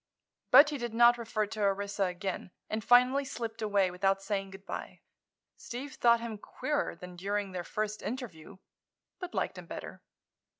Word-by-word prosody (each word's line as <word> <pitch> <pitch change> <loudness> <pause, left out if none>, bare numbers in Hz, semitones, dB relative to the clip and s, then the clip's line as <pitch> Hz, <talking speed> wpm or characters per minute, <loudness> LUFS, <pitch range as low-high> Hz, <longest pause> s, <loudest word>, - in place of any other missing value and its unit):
But 295 +1 +8
he 290 - -3
did 240 -2 -4
not 240 +1 +6
refer 225 -2 -1
to 215 +1 -6
Orissa 200 0 +1
again 185 +1 -4 0.2
and 215 0 -2
finally 250 +4 +5
slipped 230 -4 -5
away 200 -3 +2
without 195 +2 +1
saying 195 0 -2
good 195 0 -12
bye. - - -6 0.6
Steve 265 +3 -7
thought 235 -1 +4
him 225 -3 -5
queerer 290 - -2
than 180 +1 -10
during 200 +2 -2
their 180 -1 -4
first 215 +3 -3
interview, 200 - -6 0.6
but 360 -1 -6
liked - - -1
him - - -11
better. - - -8
215 Hz, 165 wpm, -31 LUFS, 195-240 Hz, 0.6 s, But